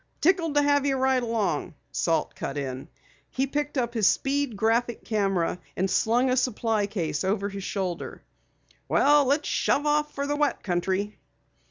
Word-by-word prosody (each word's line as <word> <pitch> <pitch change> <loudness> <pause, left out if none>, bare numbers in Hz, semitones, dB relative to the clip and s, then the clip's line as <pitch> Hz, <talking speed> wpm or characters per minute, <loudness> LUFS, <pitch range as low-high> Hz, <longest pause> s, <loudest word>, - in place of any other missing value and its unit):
"Tickled 330 -3 +2
to 290 - +4
have 285 -1 +3
you 280 -1 +1
ride 260 -1 +2
along," 225 -7 -1 0.2
Salt 165 -1 0
cut 140 - -5
in. 130 -2 -4 0.4
He 265 - 0
picked 290 +1 -3
up 235 -2 0
his 220 -4 +3
Speed 275 -4 0
Graphic 230 +3 0
camera 195 -5 0 0.2
and 190 - +1
slung 240 +6 +2
a 255 - +2
supply 225 -4 0
case 165 -7 -2
over 200 +1 0
his 195 -1 -7
shoulder. 185 -4 -4 0.6
"Well, 290 0 +4
let's 285 +3 +1
shove 290 - +1
off 300 0 +1
for 280 - -2
the 290 +1 -1
wet 295 -1 0
country." 190 +3 -1
230 Hz, 165 wpm, -26 LUFS, 195-280 Hz, 0.6 s, to